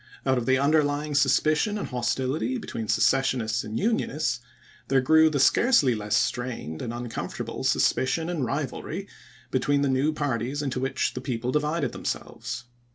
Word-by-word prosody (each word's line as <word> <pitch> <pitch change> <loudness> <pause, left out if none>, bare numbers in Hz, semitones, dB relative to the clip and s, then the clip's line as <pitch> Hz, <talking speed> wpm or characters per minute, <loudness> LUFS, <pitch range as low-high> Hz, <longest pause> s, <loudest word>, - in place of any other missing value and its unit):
Out 130 -2 +2
of 115 - -5
the 130 0 +4
underlying 145 +1 +1
suspicion 155 - +2
and - - -4
hostility 130 - -1
between 115 - -5
Secessionists 120 0 +2
and 110 +1 -4
Unionists 155 - 0 0.5
there 135 0 +3
grew 160 +4 +5
the 145 -2 -1
scarcely 145 - +4
less 105 -2 0
strained 120 -11 -2
and 115 - -3
uncomfortable 120 -1 -5
suspicion 160 +5 +1
and 170 -5 -2
rivalry 145 +8 -3 0.4
between 140 +2 +1
the - - +2
new 135 +4 +2
parties 145 -1 -2
into 135 -2 -2
which 135 +1 -1
the 125 - -5
people 125 -1 -2
divided 150 +3 0
themselves. - - -5
135 Hz, 150 wpm, -26 LUFS, 125-150 Hz, 0.5 s, grew